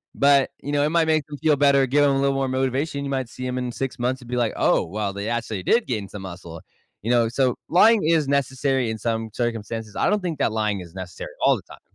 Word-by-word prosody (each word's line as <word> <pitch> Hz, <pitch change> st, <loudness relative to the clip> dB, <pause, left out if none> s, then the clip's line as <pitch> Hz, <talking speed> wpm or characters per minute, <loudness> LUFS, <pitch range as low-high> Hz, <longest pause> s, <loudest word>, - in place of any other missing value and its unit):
But, 140 Hz, -1 st, +4 dB
you 145 Hz, -, -5 dB
know, 145 Hz, 0 st, +2 dB
it 150 Hz, -, +2 dB
might 165 Hz, 0 st, +2 dB
make 155 Hz, -2 st, +2 dB
him 145 Hz, -, -7 dB
feel 155 Hz, 0 st, +3 dB
better, 140 Hz, -1 st, +4 dB
give 145 Hz, +3 st, +3 dB
him 145 Hz, -, +4 dB
a -, -, +1 dB
little 140 Hz, 0 st, +2 dB
more 135 Hz, 0 st, 0 dB
motivation. 135 Hz, +3 st, -1 dB
You 140 Hz, -, -4 dB
might 130 Hz, -3 st, -2 dB
see 130 Hz, -, -7 dB
him 125 Hz, 0 st, -2 dB
in 125 Hz, -1 st, -3 dB
6 135 Hz, +1 st, -4 dB
months 130 Hz, +2 st, -1 dB
and 120 Hz, -, -13 dB
be, 125 Hz, -, -2 dB
like, 120 Hz, -3 st, +1 dB
oh, -, -, +2 dB
well, 100 Hz, +3 st, -3 dB
they 100 Hz, +2 st, -4 dB
actually 115 Hz, -4 st, -3 dB
did 235 Hz, -, +2 dB
gain 105 Hz, -6 st, -3 dB
some 100 Hz, -2 st, -8 dB
muscle, 85 Hz, -3 st, -9 dB, 0.4 s
you 115 Hz, -, -1 dB
know, 120 Hz, -2 st, +3 dB
so 125 Hz, 0 st, +1 dB
lying 210 Hz, +5 st, +5 dB
is 160 Hz, -3 st, +2 dB
necessary 135 Hz, -2 st, 0 dB
in 110 Hz, -, -3 dB
some 115 Hz, 0 st, -2 dB
circumstances. 115 Hz, -2 st, -4 dB
I -, -, +1 dB
don't 210 Hz, +1 st, +2 dB
think 170 Hz, -5 st, -4 dB
that -, -, +1 dB
lying 105 Hz, -3 st, -1 dB
is 85 Hz, -2 st, -12 dB
necessary 95 Hz, -2 st, -7 dB, 0.2 s
all -, -, +5 dB
the -, -, -7 dB
time. -, -, -15 dB
130 Hz, 260 wpm, -23 LUFS, 110-140 Hz, 0.4 s, lying